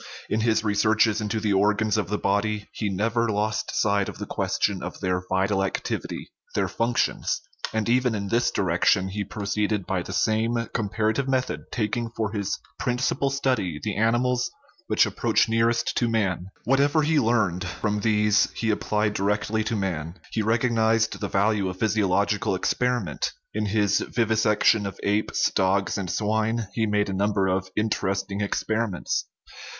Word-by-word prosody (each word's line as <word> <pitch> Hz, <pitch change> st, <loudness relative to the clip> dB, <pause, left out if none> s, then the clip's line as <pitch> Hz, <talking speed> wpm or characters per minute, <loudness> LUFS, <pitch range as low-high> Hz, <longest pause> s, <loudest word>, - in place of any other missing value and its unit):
In 110 Hz, -, +2 dB
his 110 Hz, -1 st, +2 dB
re 105 Hz, -2 st, +1 dB
searches 110 Hz, +1 st, +3 dB
into 105 Hz, +1 st, -1 dB
the 105 Hz, -2 st, 0 dB
organs 105 Hz, +2 st, +2 dB
of 105 Hz, -5 st, 0 dB
the 105 Hz, -, 0 dB
body 105 Hz, +1 st, 0 dB
he 105 Hz, -, -3 dB
never 115 Hz, +4 st, 0 dB
lost 110 Hz, +1 st, -1 dB
sight 110 Hz, -, +2 dB
40. -, -, +2 dB
OUR 100 Hz, -, +3 dB
LIFE 95 Hz, -, -1 dB
of -, -, -9 dB
the -, -, -5 dB
question -, -, -1 dB
of -, -, -6 dB
their 90 Hz, 0 st, 0 dB
vital 95 Hz, +1 st, +1 dB
activity, 95 Hz, -, -4 dB, 0.2 s
their -, -, +1 dB
functions; 120 Hz, +1 st, 0 dB, 0.3 s
and 110 Hz, 0 st, -1 dB
even 125 Hz, -1 st, +2 dB
in 100 Hz, -1 st, -3 dB
this 120 Hz, +1 st, +2 dB
direction 95 Hz, +1 st, +2 dB
he 100 Hz, +2 st, -3 dB
proceeded 105 Hz, 0 st, -2 dB
by 95 Hz, -2 st, -1 dB
the 90 Hz, -, -7 dB
same 110 Hz, +5 st, +1 dB, 0.2 s
comparative 110 Hz, +4 st, 0 dB
method, 130 Hz, -1 st, -1 dB
taking 115 Hz, +1 st, -1 dB
for 110 Hz, -2 st, -1 dB
his 100 Hz, -3 st, -2 dB, 0.2 s
principal 125 Hz, +2 st, 0 dB
study 130 Hz, -, -1 dB
the 105 Hz, -, -2 dB
animals 120 Hz, +3 st, +1 dB, 0.4 s
which -, -, +4 dB
approach -, -, +1 dB
nearest 115 Hz, +1 st, +1 dB
to 120 Hz, -, +2 dB
man. 95 Hz, -5 st, 0 dB, 0.2 s
What 135 Hz, +4 st, +2 dB
ever 145 Hz, +2 st, +3 dB
he 155 Hz, 0 st, +3 dB
learned 110 Hz, -8 st, +1 dB
from 105 Hz, +4 st, -2 dB
these 105 Hz, -1 st, +3 dB
he 110 Hz, -1 st, 0 dB
applied 105 Hz, 0 st, 0 dB
directly 105 Hz, +2 st, 0 dB
to 115 Hz, -, -1 dB
man. 85 Hz, -5 st, -3 dB, 0.2 s
He 110 Hz, -, 0 dB
recognized 115 Hz, 0 st, +2 dB
the 100 Hz, -, -2 dB
value 100 Hz, -1 st, +1 dB
of 95 Hz, -, -6 dB
physiological 100 Hz, -1 st, +1 dB
experiment; 120 Hz, -, -1 dB, 0.2 s
in 105 Hz, 0 st, -1 dB
his 105 Hz, -1 st, +2 dB
vivisection 110 Hz, -2 st, +2 dB
of 100 Hz, -, -8 dB
apes, 105 Hz, +1 st, +1 dB
dogs, 95 Hz, +1 st, +1 dB
and 95 Hz, -3 st, -3 dB
swine 110 Hz, +2 st, 0 dB
he 110 Hz, -1 st, 0 dB
made 105 Hz, 0 st, +1 dB
a -, -, -2 dB
number 100 Hz, 0 st, +1 dB
of 95 Hz, 0 st, 0 dB
interesting 100 Hz, -2 st, -1 dB
experiments. 110 Hz, -1 st, -1 dB
105 Hz, 165 wpm, -25 LUFS, 100-115 Hz, 0.4 s, which